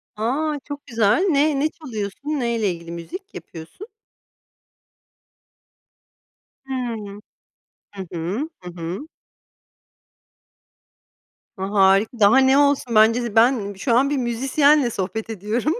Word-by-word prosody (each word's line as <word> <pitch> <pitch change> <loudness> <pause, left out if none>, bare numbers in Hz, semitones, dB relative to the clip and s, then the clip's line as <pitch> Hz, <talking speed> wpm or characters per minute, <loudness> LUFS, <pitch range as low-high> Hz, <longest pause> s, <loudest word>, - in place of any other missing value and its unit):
A, 285 +8 -1
çok 285 -1 -7
güzel. 225 - +2
Ne 290 -2 +2
ne 305 +3 +1
çalıyorsun? 245 - -7
Neyle 235 -8 0
ilgili 170 -1 -8
müzik 365 - -8
yapıyorsun? 165 - -10 2.8
Hıı. 230 -6 -5 0.8
Hı 190 -2 -7
hı. 185 - -3
Hı 180 - -8
hı. 175 - -5 2.5
A, 190 +1 -4
harika. 195 +4 +3
Daha 210 +4 +6
ne 265 0 +5
olsun? 280 -5 +2
Bence 225 +3 +5
de 235 -3 -5
ben 225 -3 +3
şu 230 +6 -1
an 275 +3 +3
bir 290 - 0
müzisyenle 270 +3 +2
sohbet 210 +1 -4
ediyorum. 225 - -1
235 Hz, 110 wpm, -22 LUFS, 200-280 Hz, 2.8 s, Daha